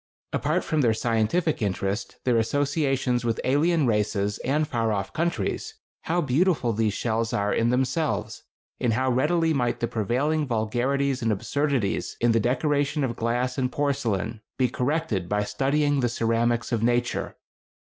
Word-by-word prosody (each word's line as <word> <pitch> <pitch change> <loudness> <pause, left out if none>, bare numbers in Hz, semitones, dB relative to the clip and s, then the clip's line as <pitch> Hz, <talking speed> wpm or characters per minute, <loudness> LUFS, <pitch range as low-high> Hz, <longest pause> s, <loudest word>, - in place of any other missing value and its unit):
Apart - - 0
from 155 -2 0
their 115 -4 +3
scientific 120 +9 0
interest, 100 0 -2
their 120 -3 +3
associations 135 0 0
with 115 -1 -1
alien 150 +4 +2
races 105 -2 0
and 150 +4 0
far 115 -5 0
off 100 -2 -2
countries, 170 +1 -2 0.3
how 175 +2 +1
beautiful 145 -3 +1
these 110 -1 0
shells 115 -1 -1
are 100 0 +1
in 115 +1 +2
themselves! 130 +5 -1 0.4
and 120 -2 +1
how 130 +3 +1
readily 160 +6 +2
might 120 -4 0
the 120 - 0
prevailing 135 +9 0
vulgarities 125 +4 0
and 115 -1 +1
absurdities 120 +1 -1
in 120 0 +3
the 115 - +3
decoration 145 +4 +1
of 120 -3 -1
glass 120 +3 -1
and 125 -1 0
porcelain 115 -7 -1 0.2
be 130 - +3
corrected 125 - -1
by 105 0 +1
studying 145 +5 +1
the 120 -2 +1
ceramics 115 0 0
of 115 -3 0
nature! 120 +1 0
125 Hz, 150 wpm, -25 LUFS, 115-145 Hz, 0.4 s, their